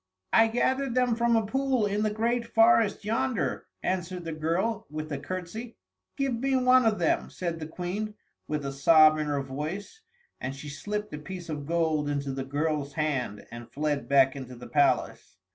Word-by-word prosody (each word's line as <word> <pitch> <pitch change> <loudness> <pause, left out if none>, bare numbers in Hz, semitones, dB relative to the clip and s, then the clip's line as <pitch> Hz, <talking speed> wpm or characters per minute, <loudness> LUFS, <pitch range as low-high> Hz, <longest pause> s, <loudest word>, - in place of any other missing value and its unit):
"I 225 0 +6
gathered 260 +2 0
them 250 -2 +3
from 235 0 +2
a 225 -1 +2
pool 265 0 +1
in 205 +1 0
the 215 - +2
great 230 +3 0
forest 225 -2 +4
yonder," 245 +2 -1 0.2
answered 180 -1 -2
the 165 - -3
girl, 170 +9 -1
with 155 +1 -6
a 140 - -2
curtsey. 185 - -6 0.4
"Give 275 -2 0
me 265 +3 0
one 255 -1 +5
of 215 -1 +2
them," 170 -3 +1
said 170 -2 -4
the 155 - -5
Queen, 190 +6 -4 0.3
with 150 -2 -2
a 140 - -2
sob 155 +2 +6
in 150 - -1
her 145 -2 -1
voice, 155 - -6 0.4
and 130 +2 -4
she 145 +2 -8
slipped 210 +9 -4
a 150 - -4
piece 180 +1 -8
of 145 -2 -5
gold 160 -3 +1
into 140 -1 -2
the 135 0 -3
girl's 145 +1 -2
hand, 135 -9 -2
and 120 0 -9
fled 145 -1 -2
back 135 -1 +5
into 130 -2 -7
the 120 +1 -10
palace. 145 -8 +1
170 Hz, 185 wpm, -28 LUFS, 145-225 Hz, 0.4 s, I